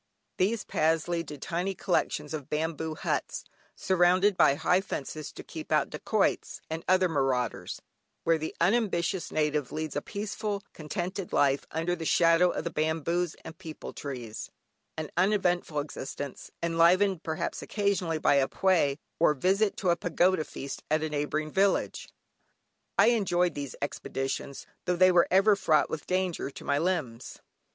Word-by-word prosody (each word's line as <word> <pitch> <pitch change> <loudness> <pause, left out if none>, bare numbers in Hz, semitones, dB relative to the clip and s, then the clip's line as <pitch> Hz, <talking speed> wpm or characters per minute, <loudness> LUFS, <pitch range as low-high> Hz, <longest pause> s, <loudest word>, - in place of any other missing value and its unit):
These 215 +4 +1
paths 160 +1 +1
lead 170 -2 -2
to 150 - -7
tiny 180 +6 -2
collections 155 -5 -1
of 150 -2 -5
bamboo 160 0 -2
huts, - - -2 0.3
surrounded 185 +2 +3
by 140 - +5
high 180 +5 +2
fences 155 -4 -5
to - - -9
keep - - -9
out - - +2
dacoits - - 0
and 160 +1 -3
other 185 0 +4
marauders, 135 -6 -1 0.4
where 165 -1 +3
the 155 - -5
unambitious 190 -2 +1
native 150 -3 0
leads 155 -1 -4
a 145 - 0
peaceful, 205 +1 -4
contented 175 +4 -4
life, 140 -1 +2
under 165 +3 -1
the 165 - -6
shadow 165 +1 +5
of - - -3
the 170 - -3
bamboos 160 +2 0
and 160 +1 -9
peepul 160 -4 -8
trees; 125 -6 -6 0.5
an 155 -1 -4
uneventful 180 -4 +1
existence, 145 -1 -6
enlivened, 170 +2 +3
perhaps, 160 -1 -3
occasionally 200 -6 0
by 145 - +3
a 135 -1 +3
Pwé, 165 -8 +2 0.2
or 155 -2 +4
visit 195 +7 +2
to 185 -3 +2
a - - +3
pagoda 175 0 +2
feast 135 0 -7
at 155 +1 +2
a 155 - -1
neighbouring 150 +1 -2
village. 195 +3 +1 0.9
I - - +6
enjoyed 180 -7 +2
these 140 -3 -5
expeditions, 135 -1 -4 0.2
tho' 180 - +1
they 185 +1 +6
were 175 -1 +5
ever 195 +3 +5
fraught 160 -6 +2
with 155 - -5
danger 185 -5 -1
to - - -11
my 140 0 +1
limbs. 155 -9 -2
165 Hz, 155 wpm, -28 LUFS, 150-185 Hz, 0.9 s, I